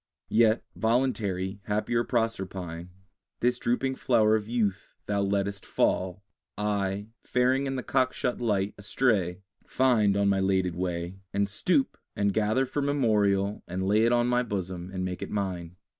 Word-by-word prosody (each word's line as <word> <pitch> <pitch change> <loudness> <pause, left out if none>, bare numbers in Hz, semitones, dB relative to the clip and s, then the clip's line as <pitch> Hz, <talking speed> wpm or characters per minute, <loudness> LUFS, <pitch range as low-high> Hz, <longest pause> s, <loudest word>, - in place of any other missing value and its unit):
Yet, 115 0 +4
voluntary, 105 -5 0
happier 110 +3 0
Proserpine, 95 -8 -2 0.5
This 125 +1 +1
drooping 130 +3 0
flower 110 -3 +3
of 105 -1 -2
youth 105 -5 -1
thou 100 -1 0
lettest 100 0 -1
fall 95 +1 0 0.3
I, 100 0 -1
faring 130 +2 +2
in 135 - -2
the 130 - -3
cockshut 130 -2 0
light, 105 -4 0
astray, 100 -5 0 0.2
Find 110 -6 +2
on 100 0 +2
my 100 -1 +3
'lated 95 -2 +1
way, 90 +1 -3 0.2
And 100 0 +2
stoop, 185 - +1 0.2
and 100 -1 +1
gather 110 +5 +2
for 140 +3 -2
memorial, 105 -8 +1
And 90 +2 -3
lay 105 +2 +4
it 120 - +3
on 120 0 +3
my 125 0 +2
bosom, 95 -5 -4
and 95 -1 -3
make 90 -1 -4
it - - -4
mine. 90 -4 -3
105 Hz, 150 wpm, -28 LUFS, 95-120 Hz, 0.5 s, Yet